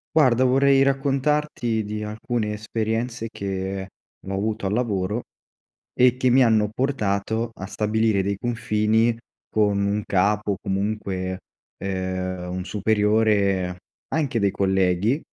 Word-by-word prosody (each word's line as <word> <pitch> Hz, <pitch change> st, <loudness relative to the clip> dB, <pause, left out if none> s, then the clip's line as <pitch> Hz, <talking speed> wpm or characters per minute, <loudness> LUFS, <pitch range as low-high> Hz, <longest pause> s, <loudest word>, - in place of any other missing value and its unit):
Guarda, 130 Hz, -5 st, +5 dB
vorrei 135 Hz, +1 st, +4 dB
raccontarti 135 Hz, -3 st, +1 dB
di 105 Hz, +1 st, -4 dB
alcune 110 Hz, 0 st, -2 dB
esperienze 115 Hz, +2 st, -2 dB
che 95 Hz, -1 st, -4 dB, 0.4 s
ho 95 Hz, -, -3 dB
avuto 105 Hz, +2 st, -2 dB
al 95 Hz, -, 0 dB
lavoro 105 Hz, -2 st, -1 dB, 0.8 s
e 125 Hz, 0 st, +6 dB
che 130 Hz, 0 st, +1 dB
mi 130 Hz, +1 st, +6 dB
hanno 110 Hz, -3 st, +3 dB
portato 110 Hz, -3 st, -1 dB
a 95 Hz, -, -6 dB
stabilire 105 Hz, 0 st, +1 dB
dei 100 Hz, +1 st, -1 dB
confini 110 Hz, 0 st, +1 dB, 0.3 s
con 105 Hz, -2 st, +2 dB
un 100 Hz, +1 st, 0 dB
capo 100 Hz, +2 st, +1 dB
o 100 Hz, -, -2 dB
comunque, 95 Hz, -2 st, -2 dB, 0.4 s
ehm, 95 Hz, -1 st, -3 dB
un 90 Hz, 0 st, -3 dB
superiore, 105 Hz, -2 st, +2 dB, 0.4 s
anche 145 Hz, -7 st, 0 dB
dei 100 Hz, -2 st, +2 dB
colleghi 95 Hz, -, +1 dB
105 Hz, 120 wpm, -23 LUFS, 95-120 Hz, 0.8 s, e